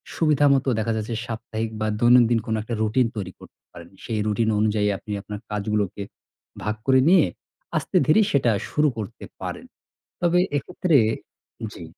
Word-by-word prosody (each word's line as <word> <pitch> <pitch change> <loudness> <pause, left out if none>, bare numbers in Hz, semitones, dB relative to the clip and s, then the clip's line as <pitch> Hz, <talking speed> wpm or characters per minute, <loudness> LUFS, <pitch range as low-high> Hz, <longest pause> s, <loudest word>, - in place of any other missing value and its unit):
সুবিধামত 145 -4 +3
দেখা 115 +1 0
যাচ্ছে 110 +2 -3
সাপ্তাহিক 115 -1 -4
বা 110 - +1
দৈনন্দিন 120 -1 +5
কোনো 110 -1 -1
একটা 110 +2 -6
routine 115 +3 +2
তৈরি 95 -3 -5
করতে - - -16
পারেন। 85 0 -12
সেই 110 -2 -2
routine 110 +1 +1
অনুযায়ী 105 -1 +1
আপনি 105 - -10
আপনার 105 +1 -7
কাজগুলোকে 105 -1 -2 0.6
ভাগ 105 0 -1
করে, 130 -1 +5
নিয়ে 180 -3 +6 0.5
আস্তে - - -5
ধীরে 155 +8 +5
সেটা 125 -6 +3 0.2
শুরু 150 0 +2
করতে 105 -3 -7 0.2
পারেন। - - -5 0.6
তবে 175 0 +3 0.2
এক্ষেত্রে 175 +3 -1 0.8
জি। - - -10
115 Hz, 150 wpm, -23 LUFS, 105-135 Hz, 0.8 s, নিয়ে